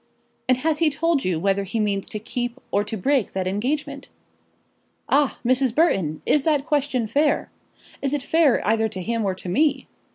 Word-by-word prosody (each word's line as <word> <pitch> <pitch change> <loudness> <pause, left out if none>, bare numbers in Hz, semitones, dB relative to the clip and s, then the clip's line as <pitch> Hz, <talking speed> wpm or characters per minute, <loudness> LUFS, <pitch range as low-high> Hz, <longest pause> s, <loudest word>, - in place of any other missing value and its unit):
"And 255 - +5
has 305 +3 0
he 330 -2 +4
told 305 0 0
you 180 -3 0
whether 195 +2 +1
he 195 +4 -3
means 200 -2 -1
to - - -4
keep, 245 +3 -4
or 205 - +2
to 220 +1 -5
break 265 +3 0
that 190 -1 -2
engagement?" 275 +8 -2 1.0
"Ah, 285 -2 +2
Mrs. 255 -1 +2
Burton, 190 - +1
is 295 - +3
that 295 -1 +1
question 290 -6 0
fair? 290 +6 +1 0.5
Is 275 - -1
it 290 -2 -1
fair 315 -2 +3
either 220 +1 +2
to 190 - -6
him, 230 +2 -1
or 190 -2 -1
to 185 - -10
me? 290 - +1
255 Hz, 185 wpm, -23 LUFS, 205-290 Hz, 1.0 s, And